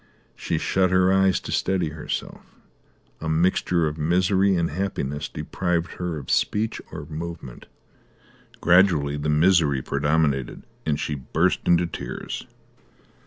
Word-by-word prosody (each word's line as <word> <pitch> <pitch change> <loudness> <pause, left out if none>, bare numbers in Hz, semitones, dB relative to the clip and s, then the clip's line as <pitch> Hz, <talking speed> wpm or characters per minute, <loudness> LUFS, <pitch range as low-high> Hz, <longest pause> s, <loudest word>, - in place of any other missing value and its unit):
She - - -2
shut 95 -1 +1
her 95 +1 +3
eyes 95 -1 +3
to - - -7
steady 90 -4 0
herself; 75 +1 -5 0.8
a 80 - -4
mixture 85 +1 +2
of 75 +1 -5
misery 95 +4 +2
and 85 -3 0
happiness 75 -5 -3
deprived 90 -1 -2
her 90 -3 -2
of 70 - -6
speech 110 +2 0
or 75 - -7
movement. 80 -4 -7 0.9
Gradually 85 -5 +4
the 75 +1 -2
misery 75 -4 +3
predominated 70 -2 0 0.2
and 75 -2 +1
she 75 - -2
burst 75 +6 0
into 85 0 +4
tears. 70 -6 -6
85 Hz, 125 wpm, -24 LUFS, 75-90 Hz, 0.9 s, Gradually